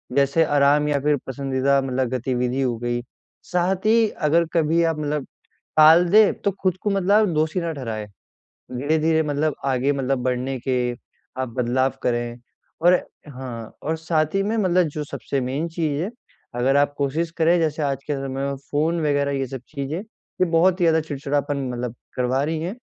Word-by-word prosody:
जैसे 140 Hz, +4 st, +3 dB
आराम, 145 Hz, 0 st, +3 dB
या 145 Hz, -1 st, +1 dB
फिर 145 Hz, +1 st, +2 dB
पसंदीदा 135 Hz, 0 st, +1 dB
मतलब 130 Hz, -2 st, -1 dB
गतिविधि 125 Hz, +1 st, -1 dB
हो 125 Hz, -3 st, 0 dB
गई। 120 Hz, 0 st, -2 dB, 0.5 s
साथ 185 Hz, +2 st, 0 dB
ही, 225 Hz, 0 st, +5 dB
अगर 165 Hz, +2 st, +1 dB
कभी 165 Hz, 0 st, +2 dB
आप 165 Hz, -2 st, +1 dB
मतलब 150 Hz, -1 st, -2 dB, 0.5 s
टाल 160 Hz, +3 st, +7 dB
दें, 215 Hz, 0 st, +6 dB
तो 200 Hz, -, -1 dB
खुद 185 Hz, -2 st, +1 dB
को 210 Hz, -, 0 dB
मतलब 195 Hz, -1 st, 0 dB
आप 215 Hz, 0 st, +5 dB
दोषी 155 Hz, +3 st, 0 dB
ना 165 Hz, -1 st, -2 dB
ठहराएँ। 115 Hz, -7 st, -5 dB, 0.7 s
धीरे-धीरे, 160 Hz, +4 st, +1 dB
मतलब, 150 Hz, 0 st, 0 dB
आगे 135 Hz, +1 st, +1 dB
मतलब 135 Hz, -1 st, -1 dB
बढ़ने 130 Hz, +1 st, -1 dB
के 125 Hz, -1 st, 0 dB, 0.5 s
आप 130 Hz, -1 st, -1 dB
बदलाव 130 Hz, +2 st, +1 dB
करें। 120 Hz, 0 st, -1 dB, 0.4 s
और 175 Hz, +1 st, +6 dB, 0.3 s
हाँ, 125 Hz, -5 st, -7 dB
और 160 Hz, +2 st, -1 dB
साथ 160 Hz, 0 st, 0 dB
ही 195 Hz, -, +2 dB
में, 215 Hz, +3 st, -1 dB
मतलब, 185 Hz, -3 st, +3 dB
जो 150 Hz, 0 st, -5 dB
सबसे 140 Hz, -1 st, -3 dB
मेन 135 Hz, +6 st, -2 dB
चीज़ 160 Hz, -3 st, -2 dB
है, 195 Hz, -, -3 dB, 0.4 s
अगर 130 Hz, +3 st, +2 dB
आप 145 Hz, 0 st, +2 dB
कोशिश 155 Hz, +4 st, -1 dB
करें, 170 Hz, +2 st, +4 dB
जैसे 155 Hz, -1 st, 0 dB
आज 140 Hz, -1 st, -2 dB
के 150 Hz, -, -1 dB
समय 135 Hz, 0 st, -4 dB, 0.2 s
में 140 Hz, -, -3 dB
फ़ोन 160 Hz, +3 st, +1 dB
वग़ैरह, 140 Hz, -1 st, +1 dB
ये 135 Hz, -, -1 dB
सब 130 Hz, 0 st, -7 dB
चीज़ें, 140 Hz, +4 st, -3 dB
ये 210 Hz, -3 st, -4 dB
बहुत 180 Hz, +3 st, +3 dB
ही -, -, +3 dB
ज़्यादा 160 Hz, -1 st, +4 dB
चिड़चिड़ापन, 140 Hz, -1 st, -2 dB
मतलब, 120 Hz, -1 st, -4 dB, 0.2 s
करवा 125 Hz, +2 st, +1 dB
रही 160 Hz, +1 st, -2 dB
हैं। 185 Hz, +7 st, -4 dB
145 Hz, 180 wpm, -23 LUFS, 130-165 Hz, 0.7 s, टाल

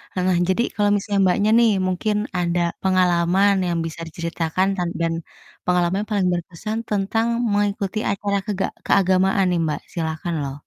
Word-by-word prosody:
ah, 185 Hz, -, 0 dB
nah 185 Hz, -1 st, +2 dB
jadi 190 Hz, +6 st, +2 dB
kalau 205 Hz, -1 st, +2 dB
misalnya, 205 Hz, 0 st, -1 dB
Mbaknya 200 Hz, +3 st, +2 dB
nih, 230 Hz, -2 st, +5 dB, 0.2 s
mungkin 195 Hz, +4 st, -1 dB, 0.2 s
ada 175 Hz, 0 st, 0 dB, 0.2 s
pengalaman 185 Hz, +1 st, +3 dB
yang 170 Hz, -, -1 dB
bisa 165 Hz, +1 st, -6 dB
diceritakan 170 Hz, +2 st, -1 dB
tan 175 Hz, -1 st, -1 dB
dan 165 Hz, 0 st, +1 dB, 0.5 s
pengalaman 180 Hz, +2 st, +1 dB
paling 200 Hz, -4 st, +1 dB
berkesan 180 Hz, +5 st, -4 dB
tentang 210 Hz, +3 st, 0 dB, 0.2 s
mengikuti 205 Hz, 0 st, 0 dB
acara 200 Hz, 0 st, -1 dB
kega 200 Hz, -2 st, -1 dB, 0.2 s
keagamaan 190 Hz, 0 st, +3 dB
nih, 175 Hz, -, +1 dB
Mbak, 150 Hz, -2 st, -2 dB
silahkan 165 Hz, 0 st, -3 dB
loh! 135 Hz, -1 st, -4 dB
185 Hz, 150 wpm, -22 LUFS, 170-200 Hz, 0.5 s, nih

